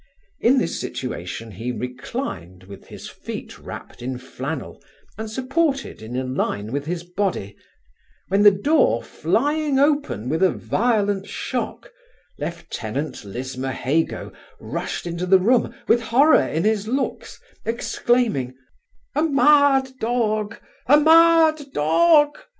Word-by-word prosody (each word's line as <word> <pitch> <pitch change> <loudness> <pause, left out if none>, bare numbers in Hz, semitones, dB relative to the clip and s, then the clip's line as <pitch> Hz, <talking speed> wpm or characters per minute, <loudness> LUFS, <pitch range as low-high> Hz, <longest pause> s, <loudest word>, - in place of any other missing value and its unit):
In 255 +4 +4
this 255 - 0
situation 110 -2 -5
he 115 +6 -4
reclined, 125 - -6
with 95 +1 -13
his - - -10
feet - - -8
wrapped - - -10
in 125 +1 -4
flannel, 130 +2 -6 0.3
and 220 +1 -6
supported 270 - -1
in 115 +3 -6
a 130 - -1
line 115 -5 -2
with 140 +2 -3
his 170 0 -3
body, 175 - -3 0.7
when 195 +2 +2
the 205 - +9
door 295 - +2
flying 295 -1 0
open 280 - +1
with 160 +6 -1
a 190 - +5
violent 205 -4 0
shock, - - -4 0.5
lieutenant 140 -6 -5
Lismahago 130 +7 -3 0.3
rushed - - -4
into 170 +1 -3
the 190 +1 +7
room 230 +6 +2 0.2
with 240 - +4
horror 270 +7 +4
in 160 +2 -1
his 215 -1 +1
looks, 265 +3 -3 0.2
exclaiming, 230 - 0 0.6
'A 295 - +1
mad 285 -3 +4
dog! 220 -2 -1 0.3
a 290 +4 +7
mad 320 0 +5
dog! 295 - +4
205 Hz, 120 wpm, -22 LUFS, -, 0.7 s, the